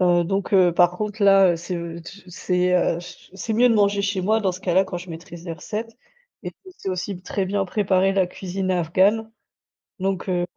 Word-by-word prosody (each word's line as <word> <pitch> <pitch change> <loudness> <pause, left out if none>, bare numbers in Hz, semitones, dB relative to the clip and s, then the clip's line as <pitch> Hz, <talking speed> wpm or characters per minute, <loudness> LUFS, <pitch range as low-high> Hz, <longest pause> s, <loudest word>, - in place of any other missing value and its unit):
heu, 175 -1 +3
donc 195 +3 -2
heu, 185 -3 +5
par 175 0 +5
contre, 210 +3 -4
là, 195 -2 +6
heu, - - -2
c'est, 175 +2 -5
heu, 170 0 -6
tu 190 +2 -13
c'est, 180 0 0
heu, 170 -1 +2
ch 175 0 -12
c'est 195 +4 -4
mieux 240 +3 +4
de 230 - +3
manger 200 -1 +2
chez 195 -1 -1
moi 220 +4 +2
dans 195 - +1
ce 180 - -7
cas-là 185 +1 +2
quand 185 -2 -5
je 175 +1 -11
maîtrise 170 +1 -10
les 170 - -5
recettes 220 +7 -6 0.5
et - - -5
puis - - -31 0.2
je - - -28
sais - - -5
aussi 185 0 -4
très 190 0 -2
bien 200 0 0
préparer 195 -1 +1
la 190 -2 +2
cuisine 185 +1 -4
afghane, 190 +6 +2 0.7
donc 190 0 -2
heu, 175 -1 0
185 Hz, 225 wpm, -22 LUFS, 175-200 Hz, 0.7 s, là